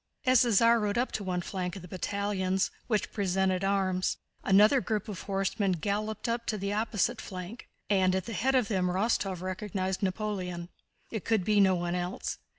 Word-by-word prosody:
As 255 Hz, -1 st, +6 dB
the 240 Hz, -, +3 dB
Tsar 230 Hz, +3 st, +5 dB
rode 210 Hz, 0 st, -1 dB
up 250 Hz, +2 st, +1 dB
to 210 Hz, -, -3 dB
one 180 Hz, -2 st, -1 dB
flank 180 Hz, -1 st, -4 dB
of 190 Hz, -, -8 dB
the -, -, -9 dB
battalions, 190 Hz, +1 st, -1 dB, 0.2 s
which 215 Hz, -4 st, 0 dB
presented 190 Hz, -1 st, 0 dB
arms, 190 Hz, -2 st, +1 dB, 0.3 s
another 210 Hz, +7 st, +5 dB
group 215 Hz, -3 st, -2 dB
of 200 Hz, -5 st, -6 dB
horsemen 195 Hz, 0 st, 0 dB
galloped 205 Hz, +7 st, -2 dB
up 230 Hz, 0 st, -2 dB
to 215 Hz, -, 0 dB
the 200 Hz, +1 st, -2 dB
opposite 220 Hz, +1 st, 0 dB
flank, 185 Hz, +5 st, -8 dB, 0.2 s
and 190 Hz, -2 st, +3 dB
at 190 Hz, -1 st, -1 dB
the 230 Hz, -, -5 dB
head 260 Hz, +7 st, +1 dB
of 250 Hz, -5 st, +3 dB
them 190 Hz, -5 st, +1 dB
Rostóv 190 Hz, -1 st, 0 dB
recognized 185 Hz, 0 st, -3 dB
Napoleon. 185 Hz, -3 st, -2 dB, 0.4 s
It 220 Hz, -4 st, -3 dB
could 220 Hz, -4 st, +1 dB
be 210 Hz, -1 st, +3 dB
no 190 Hz, -2 st, +5 dB
one 175 Hz, 0 st, -2 dB
else. 180 Hz, +1 st, -3 dB
195 Hz, 185 wpm, -29 LUFS, 185-215 Hz, 0.4 s, As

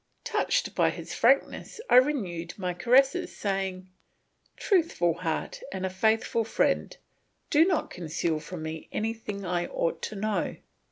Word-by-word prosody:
Touched -, -, 0 dB
by -, -, +3 dB
his -, -, -6 dB
frankness 465 Hz, -, +2 dB
I -, -, +6 dB
renewed 215 Hz, -, +1 dB
my 180 Hz, -3 st, -2 dB
caresses, 270 Hz, -, +3 dB
saying, 190 Hz, -2 st, -2 dB, 0.7 s
"Truthful 325 Hz, -, +2 dB
heart 175 Hz, -, -3 dB
and 190 Hz, 0 st, -3 dB
faithful 220 Hz, +3 st, +2 dB
friend, 225 Hz, -, 0 dB, 0.5 s
do 310 Hz, +1 st, +6 dB
not 355 Hz, -5 st, 0 dB
conceal 165 Hz, -1 st, -2 dB
from 160 Hz, +1 st, -7 dB
me 160 Hz, 0 st, -6 dB
anything 215 Hz, -2 st, -3 dB
I 175 Hz, -1 st, -1 dB
ought 165 Hz, -, -2 dB
to 215 Hz, -, -4 dB
know. 210 Hz, +1 st, -1 dB
195 Hz, 130 wpm, -28 LUFS, 175-245 Hz, 0.7 s, I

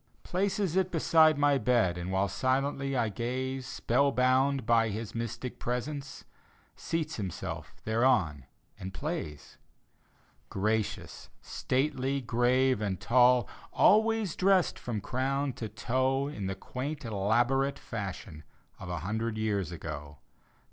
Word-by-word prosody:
Places 195 Hz, -1 st, -1 dB
it 190 Hz, -1 st, +2 dB
beside 160 Hz, -2 st, +4 dB
my 145 Hz, -1 st, +3 dB
bed. 115 Hz, -7 st, +2 dB
And 90 Hz, +1 st, -5 dB
while 95 Hz, +1 st, +1 dB
silently 135 Hz, +3 st, 0 dB
I 115 Hz, -3 st, +1 dB
gaze 130 Hz, +4 st, -3 dB
Spell 135 Hz, +1 st, +1 dB
bound 130 Hz, +1 st, +2 dB
by 115 Hz, -1 st, +3 dB
his 110 Hz, +1 st, -5 dB
mystic 115 Hz, +2 st, -5 dB
presence, 135 Hz, +3 st, -4 dB, 0.5 s
Seats 160 Hz, -2 st, -3 dB
himself 95 Hz, -6 st, -5 dB
thereon 110 Hz, -, +2 dB, 0.3 s
and 95 Hz, +1 st, -7 dB
plays. 150 Hz, -, -5 dB, 0.9 s
Gracious, 110 Hz, +2 st, -2 dB
stately, 135 Hz, 0 st, -1 dB
grave 125 Hz, 0 st, +2 dB
and 100 Hz, -3 st, -2 dB
tall. 125 Hz, -1 st, +4 dB, 0.2 s
Always 220 Hz, -3 st, +3 dB
dressed 190 Hz, -1 st, +3 dB
from 115 Hz, -4 st, -4 dB
crown 135 Hz, +4 st, -1 dB
to 110 Hz, -2 st, -6 dB
toe 130 Hz, +4 st, 0 dB
In 105 Hz, -10 st, -4 dB
the 95 Hz, -, -3 dB
quaint 135 Hz, +8 st, -5 dB
elaborate 120 Hz, +7 st, +1 dB
fashion 95 Hz, -7 st, -6 dB, 0.4 s
Of 95 Hz, -, -8 dB
a 90 Hz, -2 st, -3 dB
hundred 110 Hz, +4 st, -2 dB
years 100 Hz, -5 st, -1 dB
ago. 75 Hz, -3 st, -7 dB
125 Hz, 120 wpm, -30 LUFS, 105-140 Hz, 0.9 s, beside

